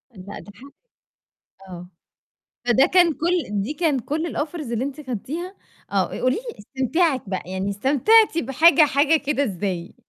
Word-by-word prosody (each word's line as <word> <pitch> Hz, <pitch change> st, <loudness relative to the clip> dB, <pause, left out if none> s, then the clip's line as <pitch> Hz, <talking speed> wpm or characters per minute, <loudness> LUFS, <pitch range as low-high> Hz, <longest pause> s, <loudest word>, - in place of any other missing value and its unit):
لا 195 Hz, +2 st, -9 dB
ده 205 Hz, -, -13 dB
حقك 275 Hz, +2 st, -15 dB, 1.0 s
آه 180 Hz, -1 st, -10 dB, 0.8 s
فده 250 Hz, +3 st, +4 dB
كان 350 Hz, -3 st, +3 dB
كل 325 Hz, -, -1 dB
دي 235 Hz, +10 st, -4 dB
كان 300 Hz, -4 st, 0 dB
كل 315 Hz, +7 st, -4 dB
الoffers 300 Hz, -4 st, -4 dB
اللي 235 Hz, +1 st, -1 dB
أنتِ 285 Hz, +2 st, -7 dB
خدتيها 330 Hz, -, -5 dB, 0.4 s
آه -, -, +1 dB
قولي 255 Hz, +1 st, -1 dB
لي 475 Hz, -, -8 dB
استمتاعِك 265 Hz, -, -1 dB
بقى 190 Hz, -, -3 dB
يعني 190 Hz, +1 st, -3 dB
استمتعتي 295 Hz, -, +3 dB
بحاجة 310 Hz, +7 st, +4 dB
حاجة 290 Hz, +3 st, +2 dB
كده 285 Hz, -1 st, -1 dB
إزاي؟ 185 Hz, -5 st, -4 dB
275 Hz, 150 wpm, -22 LUFS, 210-325 Hz, 1.0 s, فده